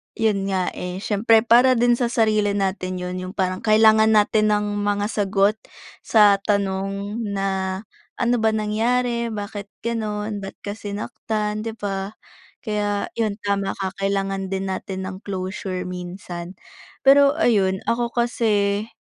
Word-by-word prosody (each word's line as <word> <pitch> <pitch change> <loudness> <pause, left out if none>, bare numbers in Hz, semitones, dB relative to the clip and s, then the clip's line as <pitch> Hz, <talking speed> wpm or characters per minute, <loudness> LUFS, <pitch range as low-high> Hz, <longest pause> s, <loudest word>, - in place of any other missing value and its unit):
Yun 210 -3 +1
nga, 190 -2 0
eh, 180 +1 -6
siyempre 220 +2 +3
para 245 +2 +5
din 240 0 +3
sa 245 - +2
sarili 215 -3 +2
natin 190 -2 -1
yun 180 0 -4
yung 185 +1 -7
parang 185 -1 -1
kailangan 220 0 +5
natin 215 0 +3
ng 205 0 -1
mga 205 0 0
sagot 200 +1 +1 0.4
sa 205 -3 +5
tanong 200 +1 -1
na, 190 -1 -2 0.4
ano 245 0 +2
ba 220 - +4
nangyari, 235 +3 0
bakit 205 -1 -6 0.2
ganun, 215 -2 -3
ba't 195 0 -7
kasi 205 0 -5
sinaktan 215 -1 -3
'di 225 0 -5
ba. 195 0 -4 0.5
Kaya 205 -2 -1
yun 215 -3 -1
tama 200 -1 -1
ka 190 -1 -3
kailangan 195 -1 -1
din 195 0 -2
natin 190 0 -5
ng 190 0 -6
closure 185 -1 -4
minsan. 180 0 -7 0.5
Pero 280 +1 +6
ayun 200 -10 +2
ako 235 0 0
kasi. 215 -3 +1
205 Hz, 140 wpm, -22 LUFS, 195-220 Hz, 0.5 s, Pero